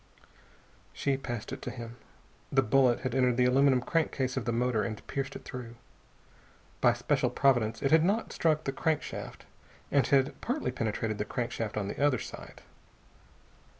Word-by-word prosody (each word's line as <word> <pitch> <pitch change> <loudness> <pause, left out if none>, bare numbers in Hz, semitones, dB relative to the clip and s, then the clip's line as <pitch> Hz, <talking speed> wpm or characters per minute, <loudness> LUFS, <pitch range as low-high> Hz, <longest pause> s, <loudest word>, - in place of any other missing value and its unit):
She 140 -1 0
passed 120 -5 -5
it - - -7
to - - -4
him. 115 -1 -8 0.6
The 135 -1 +4
bullet 125 0 +3
had 130 -2 -2
entered 125 -2 +2
the 125 - +4
aluminum 130 0 +4
crankcase 135 -3 0
of 130 -5 -2
the 120 - 0
motor 120 -1 +1
and 105 0 -4
pierced 135 0 -4
it - - -9
through. 120 -2 -7 1.1
By - - +5
special - - 0
providence 120 -4 +2
it 135 - +2
had 160 0 +6
not 205 +6 0
struck 155 -2 +1
the 135 - -2
crankshaft, 155 +2 -3 0.5
and 140 -2 +3
had 135 0 +2
partly 275 +5 -1
penetrated 110 -1 -2
the 105 - -1
crankcase 115 -3 -3
on 100 -2 -1
the 140 - -3
other 145 -3 +4
side. - - -9
130 Hz, 165 wpm, -30 LUFS, 115-140 Hz, 1.1 s, had